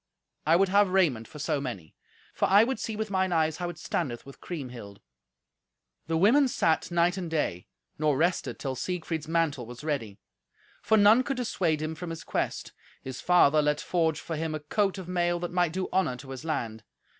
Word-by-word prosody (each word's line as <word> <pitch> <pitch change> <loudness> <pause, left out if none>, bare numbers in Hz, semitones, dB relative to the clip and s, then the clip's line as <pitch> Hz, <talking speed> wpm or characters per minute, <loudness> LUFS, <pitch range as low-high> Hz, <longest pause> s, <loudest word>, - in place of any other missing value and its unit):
I 165 - +6
would 190 +2 +3
have 200 0 +4
raiment 155 - +2
for - - -12
so 150 -1 -1
many; 100 - -6 0.4
for - - +1
I 200 +3 +6
would 260 +3 -1
see 220 - -3
with 215 -1 -3
mine 190 -1 +1
eyes 160 -2 +1
how 175 -1 -3
it 175 - -8
standeth 135 -7 -3
with 140 - -13
Kriemhild." 125 - -7 1.1
The 165 0 0
women 245 - +5
sat 165 -10 +1
night 175 +1 +2
and 180 -3 -4
day, 120 - -2 0.3
nor 150 -3 +2
rested 170 +3 0
till 135 -2 -3
Siegfried's 160 +2 -3
mantle 160 -7 0
was 120 +3 -10
ready; 115 -10 -3 0.6
for 220 +1 +3
none 210 +4 +6
could 270 0 -3
dissuade 175 -10 0
him 155 +1 -3
from 170 +2 -7
his 165 0 -6
quest. - - -3 0.3
His 130 -1 -6
father 155 -4 +5
let 150 0 +1
forge 160 -3 0
for 165 - -5
him 155 0 -2
a - - -3
coat 195 +7 0
of 185 -2 -7
mail 175 -1 0
that 175 0 -4
might 175 -2 +1
do 185 +2 -2
honour 185 -10 +1
to 135 +1 -10
his 130 +1 -7
land. 115 -9 -3
165 Hz, 200 wpm, -28 LUFS, 145-185 Hz, 1.1 s, I